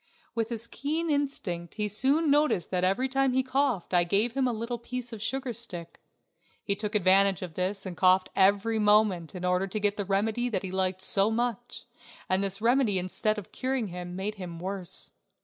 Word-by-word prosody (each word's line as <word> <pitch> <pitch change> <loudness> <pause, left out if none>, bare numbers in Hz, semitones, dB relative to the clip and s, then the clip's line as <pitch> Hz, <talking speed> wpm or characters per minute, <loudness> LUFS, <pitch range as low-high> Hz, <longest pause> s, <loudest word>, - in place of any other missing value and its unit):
With 230 -1 -1
his 230 -1 -3
keen 310 +7 -2
instinct, 210 - -2
he 210 -1 -1
soon 275 - +2
noticed 290 - +2
that 180 -1 0
every 195 +8 +2
time 270 0 +1
he 260 +1 +2
coughed 260 -8 0
I 175 -1 +5
gave 200 +7 +2
him 265 -1 +1
a - - +1
little 235 +1 -4
piece 245 0 -4
of 215 - -7
sugar 260 +2 -1
stick. 185 -7 -6 0.6
He 200 - 0
took 210 +1 -4
advantage 195 -1 +4
of 175 -3 -7
this 185 +4 -2
and 185 -2 -5
coughed 185 +1 +3
every 200 +3 +3
moment 210 -5 +3
in 180 0 -4
order 180 +1 +1
to 215 +3 -3
get 205 0 +1
the 205 - -1
remedy 215 +5 0
that 200 -5 -2
he 190 - -5
liked 185 0 -1
so 200 -1 +3
much, 240 +1 -3 0.4
and 185 +1 +1
this 195 +1 -3
remedy 235 -4 +3
instead 185 +4 0
of 205 - -8
curing 255 -5 -2
him 180 0 -7
made 195 +3 -3
him 175 -2 -6
worse. 185 +1 -3
210 Hz, 200 wpm, -28 LUFS, 185-245 Hz, 0.6 s, I